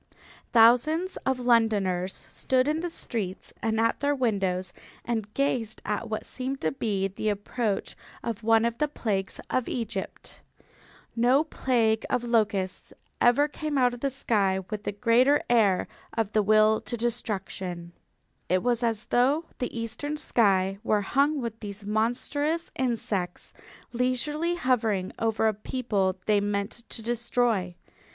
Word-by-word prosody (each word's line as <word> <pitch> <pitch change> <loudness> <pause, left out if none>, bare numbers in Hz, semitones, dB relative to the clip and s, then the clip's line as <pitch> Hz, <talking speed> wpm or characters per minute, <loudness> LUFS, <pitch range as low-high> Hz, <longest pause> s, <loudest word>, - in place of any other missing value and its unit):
Thousands 250 +11 +4
of 265 -1 +1
Londoners 205 -7 +1
stood 255 0 +1
in 305 +1 +1
the 350 +1 -3
streets 210 - -4
and 225 0 0
at 230 0 +2
their 285 0 +1
windows 195 -8 0 0.3
and 220 -3 -2
gazed 245 -6 0
at 215 +2 -2
what 215 0 -3
seemed 265 +1 -4
to - - +1
be 205 -7 -1
the 200 +3 -3
approach 205 +1 -2 0.3
of 230 -2 -3
one 225 0 +4
of 235 0 -2
the 300 - +2
plagues 200 -9 -2
of 255 - 0
Egypt. 225 -5 -5 0.7
No 250 +5 +4
plague 230 -7 +1
of 250 -1 0
locusts 205 -5 0 0.3
ever 245 +5 +5
came 300 -1 -3
out 250 -2 +3
of 245 - -7
the 275 - 0
sky 205 -8 +1
with 210 -1 -5
a - - +1
greater 245 +7 +4
air 205 -6 +3 0.3
of 220 -3 0
the 215 - +3
will 215 +1 +4
to 240 - -4
destruction. 190 -7 -4 0.6
It 185 +1 +2
was 245 -1 +1
as 230 -1 0
though 275 +7 +2
the 245 -2 -3
eastern 240 +7 -3
sky 195 -7 +2
were 215 -2 +2
hung 280 +8 +2
with 230 -2 -5
these 205 -1 -7
monstrous 270 +9 -1
insects, 215 -8 -2 0.4
leisurely 295 +7 0
hovering 225 - +1
over 225 -1 +1
a 220 - +2
people 205 -4 -1
they 210 -1 +3
meant 205 +3 -3
to 225 - -5
destroy. 235 -5 0
230 Hz, 145 wpm, -27 LUFS, 205-255 Hz, 0.7 s, ever